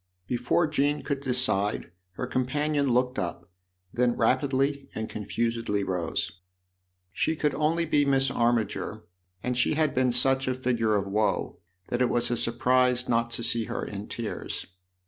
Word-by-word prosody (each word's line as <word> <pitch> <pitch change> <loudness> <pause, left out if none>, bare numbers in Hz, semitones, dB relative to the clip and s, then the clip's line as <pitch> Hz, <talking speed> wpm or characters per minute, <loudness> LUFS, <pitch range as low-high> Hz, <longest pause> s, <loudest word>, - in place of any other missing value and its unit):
Before 125 - +1
Jean 145 -1 0
could 140 -1 -2
decide 120 -8 +1 0.2
her 125 - -4
com 125 0 -1
panion 145 0 0
looked 125 +1 +1
up, 85 0 -5 0.4
then 120 0 +1
rapidly 135 +3 +1
and 110 0 -3
confusedly 115 -1 -2
rose. 90 -4 -2 0.8
She 160 +9 0
could 150 -2 0
only 160 +3 +1
be 150 -2 +3
Miss 135 -1 +3
Armiger, 120 -2 0 0.4
and 125 0 -1
she 125 +4 +2
had 155 -1 +1
b^sn 130 -1 +3
such 135 +2 +1
a 130 - +1
figure 120 -4 +1
of 100 -1 0
woe 105 +2 0 0.3
that 120 - -1
it 125 - +3
was 120 0 +2
a - - +2
surprise 125 +2 +2
not 115 0 +1
to 115 0 -3
see 115 -1 +1
her - - -4
in 100 0 -6
tears. 115 -2 -5
125 Hz, 160 wpm, -27 LUFS, 115-135 Hz, 0.8 s, be